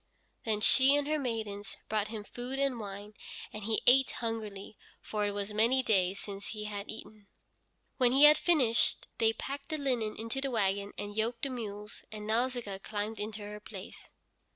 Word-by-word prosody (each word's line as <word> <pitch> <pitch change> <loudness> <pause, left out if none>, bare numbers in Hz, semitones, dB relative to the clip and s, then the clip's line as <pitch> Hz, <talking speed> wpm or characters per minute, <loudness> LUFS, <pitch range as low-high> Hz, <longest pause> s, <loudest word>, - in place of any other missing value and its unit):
Then 215 -2 0
she 265 +5 +7
and 290 0 +1
her 305 0 +1
maidens 220 -5 -4
brought 215 -1 0
him 215 -1 -6
food 245 +5 -5
and 275 -3 +1
wine, 205 0 -7 0.4
and 215 -1 -5
he 220 0 +1
ate 265 +2 +6
hungrily, 215 -3 -4 0.2
for 210 -1 -2
it - - -1
was 205 +1 -3
many 235 +5 +4
days 195 -4 +2
since 200 0 -7
he 215 -1 -5
had 205 -1 -5
eaten. 215 -2 -8 0.7
When 250 -2 +4
he 270 +3 +5
had 300 +1 +9
finished, 260 -10 +2
they 225 -1 +5
packed 275 +5 -6
the 310 - -1
linen 245 -7 -1
into 230 +4 -3
the 275 - 0
wagon, 200 -3 0
and 205 0 -5
yoked 230 +2 -1
the 275 - 0
mules, 210 -4 -6
and 210 -1 -7
Nausicaa 230 -3 0
climbed 210 +2 -4
into 210 0 -4
her 210 0 -7
place. 210 - -9
220 Hz, 180 wpm, -31 LUFS, 205-250 Hz, 0.7 s, had